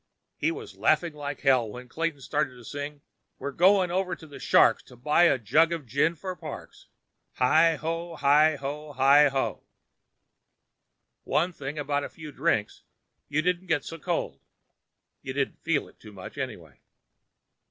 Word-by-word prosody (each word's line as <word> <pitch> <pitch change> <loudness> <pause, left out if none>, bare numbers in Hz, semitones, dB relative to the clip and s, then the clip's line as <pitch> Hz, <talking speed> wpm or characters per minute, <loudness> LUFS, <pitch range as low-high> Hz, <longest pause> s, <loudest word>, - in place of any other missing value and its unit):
He - - 0
was 425 +5 -8
laughing 170 -3 +2
like 145 -2 -6
hell 130 -5 +3
when 125 +4 -9
Clayton 160 +1 -3
started 145 -1 -1
to 120 - -14
sing. 145 +3 -6 0.4
"We're 140 - -5
going 185 +3 +4
over 185 -1 -1
to 160 - -14
the 145 -2 -11
Shark's - - +4
To 125 - -15
buy 150 +8 +3
a 165 - +4
jug 155 +8 +3
of 165 -4 -3
gin 140 +8 +1
for 185 +3 -6
Parks! 155 -4 -10 0.5
Hi 160 +6 +4
ho, 165 +2 -4
hi 150 +2 +4
ho, 145 +2 -6
hi 140 +2 +6
ho!" 135 -1 -2 1.6
One 175 +4 0
thing 140 0 -6
about 145 -1 -1
a - - -5
few 155 -2 -10
drinks; 105 -5 -1 0.5
you 150 +2 0
didn't 180 +1 0
get 145 - 0
so 165 - -7
cold. - - -2 0.8
You 130 - -6
didn't 140 0 -2
feel 160 -3 0
it - - -21
too 105 - -13
much, 95 -2 -10
anyway. 105 - -7
150 Hz, 165 wpm, -27 LUFS, 135-165 Hz, 1.6 s, hi